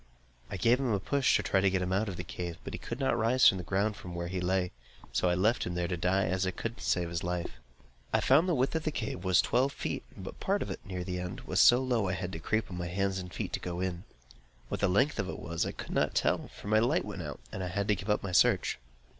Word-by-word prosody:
I - - -4
gave 120 +7 +4
him 130 -4 0
a 100 - +1
push, 140 +6 +2
to - - +2
try 95 - +2
to 95 - +4
get 95 -1 0
him 90 +1 -1
out 105 +3 +1
of 95 - -5
the 90 - -4
cave, 85 -2 -5
but - - -6
he - - -4
could 120 - -6
not 135 -3 +2
rise 120 +3 +4
from 95 - +4
the - - -5
ground 100 +4 0
where 85 -1 -5
he 90 0 -3
lay; 90 0 +1 0.4
so 90 - +2
I 90 - +2
left 110 +7 +2
him 90 - -3
there 90 0 0
to 90 - -1
die, 90 +3 +1
as 95 +2 0
I - - +2
could 115 +5 -5
not - - -12
save 90 -2 0
his 85 -1 -3
life. 90 -7 -3 0.5
I - - +3
found 155 +8 +4
the 175 - +2
width 130 +1 +1
of 160 - 0
the 155 - 0
cave 110 - -4
was 95 -2 +4
twelve 130 +3 +2
feet; - - -3 0.2
but 95 - -8
part 200 +1 0
of - - -6
it, - - -7
near 90 -2 -5
the 90 0 -3
end, 90 +1 -5
was 90 - -1
so 125 +2 +7
low 120 -6 +1
that 90 - 0
I - - -1
had 90 0 -4
to 80 - -5
creep 110 +5 -1
on 90 - -5
my 90 - -3
hands 95 +2 -1
and 90 -1 -7
feet - - -4
to - - -1
go 90 -1 -4
in. 90 -1 -2 0.7
What - - -3
the 100 - +3
length 130 +11 +2
of 95 -1 -1
it - - -5
was 85 0 -2
I - - -2
could - - -8
not - - +1
tell, - - +1
for - - -12
my 110 +1 +4
light 125 +8 +2
went 100 -3 -6
out, 75 -5 -6
and 95 - -4
I - - -2
had 100 +3 -2
to 105 - +4
give 100 +3 -7
up 105 - +2
my 100 - -3
search. 90 - +3
95 Hz, 295 wpm, -30 LUFS, 90-110 Hz, 0.7 s, so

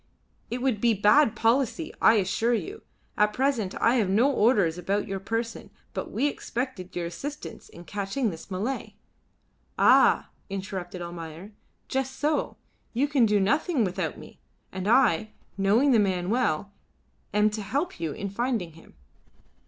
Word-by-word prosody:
"It 245 +2 -3
would 245 -6 0
be 235 -2 +3
bad 215 +5 +4
policy, 250 +7 +1
I 225 - +6
assure 220 +4 +1
you. 395 - -5 0.4
At 210 0 +3
present 250 -7 0
I 240 +2 +3
have 210 -5 +1
no 235 +9 +4
orders 205 -9 +2
about 200 +4 -1
your 195 0 -3
person, 225 +4 -4 0.2
but - - -4
we - - -1
expected 245 -9 -4
your 175 -1 -2
assistance 280 - -7
in 170 - -12
catching 205 +5 -2
this 165 +2 -10
Malay." 210 +8 -3 0.8
"Ah!" - - +5 0.2
interrupted 190 -2 -5
Almayer, 170 +2 -8 0.4
"just 265 0 -2
so: 300 +1 -1 0.4
you 265 +5 +1
can 275 -6 +3
do 210 -1 +3
nothing 280 - +2
without 185 -2 -2
me, - - -13 0.3
and 190 +1 -4
I, 215 -4 +3 0.2
knowing 210 +8 +3
the 235 - +5
man 185 -2 0
well, 200 -6 0 0.6
am 210 +1 +3
to 215 0 -4
help 280 - -2
you 165 -2 -2
in 200 - -5
finding 220 -3 -2
him." 165 +1 -18
215 Hz, 150 wpm, -26 LUFS, 190-255 Hz, 0.8 s, I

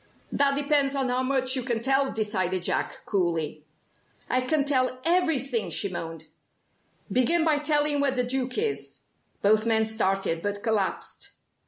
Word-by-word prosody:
"That 280 0 +2
depends 285 -1 +2
on 265 -2 0
how 250 +1 0
much 260 0 +1
you 260 - -1
can 240 -2 -2
tell," 270 +3 +1
decided 185 -4 -1
Jack, - - -1
coolly. 165 -6 -2 0.7
"I 255 - +2
can 280 +2 0
tell 255 -3 +1
everything," 275 - +1
she 200 +5 +2
moaned. 165 -3 -6 0.9
"Begin 320 +7 +3
by 305 -2 +2
telling 295 -1 +2
where 285 - +3
the 255 -2 0
Duke 255 +1 -1
is." 435 0 -2 0.5
Both 215 +2 +3
men 220 -1 +3
started, 195 -6 0
but 205 +1 -4
collapsed. 215 -4 -2
255 Hz, 150 wpm, -26 LUFS, 205-280 Hz, 0.9 s, Begin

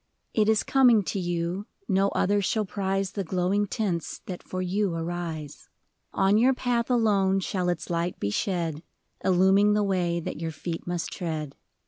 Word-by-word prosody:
It 215 -1 +3
is 220 -1 +3
coming 245 -6 +5
to 195 - -3
you, 175 +2 -2 0.2
no 195 0 +3
other 205 +1 +1
shall 215 +2 0
prize 195 -1 -1
The 200 - -3
glowing 185 +4 0
tints 185 -6 -2
that 180 -2 -6
for 185 - -6
you 185 0 0
arise. 165 -3 -5 0.4
On 195 +2 +3
your 255 +3 +4
path 240 -2 0
alone 200 -5 +3
shall 185 -1 -1
its 175 -2 -2
light 170 +1 -2
be 100 - -1
shed. 165 - -1 0.4
Illuming 190 +3 +4
the 210 - +2
way 180 -3 0
that 165 - -5
your 165 - -2
feet 165 +2 -6
must 175 -1 -2
tread. 155 -5 -4
190 Hz, 165 wpm, -26 LUFS, 170-205 Hz, 0.4 s, coming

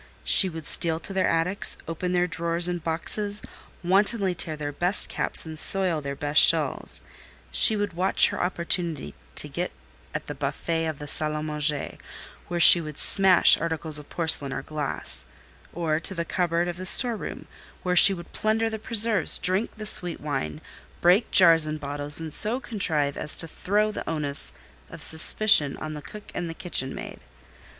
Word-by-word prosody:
She 190 - +3
would 160 -2 -11
steal 165 0 -1
to 195 - -9
their 190 -1 -1
attics, 165 +4 0
open 170 +2 -6
their 180 0 0
drawers 170 0 +1
and 175 -2 -5
boxes, 205 +6 -3 0.4
wantonly 195 +1 0
tear 160 -2 -4
their 145 -1 -6
best 175 +7 0
caps - - +1
and 160 -1 -8
soil 185 -5 +1
their 140 0 -7
best 145 +2 +2
shawls; 155 -5 +2 0.5
she 220 - +6
would 205 -3 -4
watch 185 +3 +2
her - - -6
opportunity 170 - -4 0.2
to - - +4
get - - -6 0.4
at - - -6
the - - -8
buffet 165 -1 -5
of 155 -2 -6
the 145 - -10
salle 150 +1 0
à 150 0 -6
manger, 150 -1 -4 0.5
where 175 -1 -5
she 170 0 +8
would 155 -2 -10
smash 190 -3 +4
articles 160 -2 -2
of 150 - -16
porcelain 160 -5 +2
or 135 - -7
glass—or 155 +2 -6
to 190 - -5
the 170 -1 -5
cupboard 175 -1 -3
of 175 0 -7
the 185 +1 -6
storeroom, 235 +1 +2 0.4
where 180 0 -2
she 190 - +9
would 175 -3 -9
plunder 220 +1 -2
the 220 - -7
preserves, 220 -4 +3
drink 190 +5 -2
the 215 - -9
sweet 180 -5 0
wine, 75 - -6 0.4
break 180 +6 +1
jars 165 -4 +5
and 155 0 -6
bottles, 145 +1 +1
and 160 -2 -4
so 225 +5 +3
contrive 160 - -3
as 150 - +4
to 165 - -5
throw 210 +6 -3
the - - -8
onus 150 -3 +2 0.4
of - - -9
suspicion 160 -2 +3
on 155 0 -8
the 150 - -9
cook 210 +8 -13
and 175 -1 -6
the 165 - -9
kitchen 135 -8 -3
maid. - - -10
170 Hz, 175 wpm, -23 LUFS, 155-190 Hz, 0.5 s, she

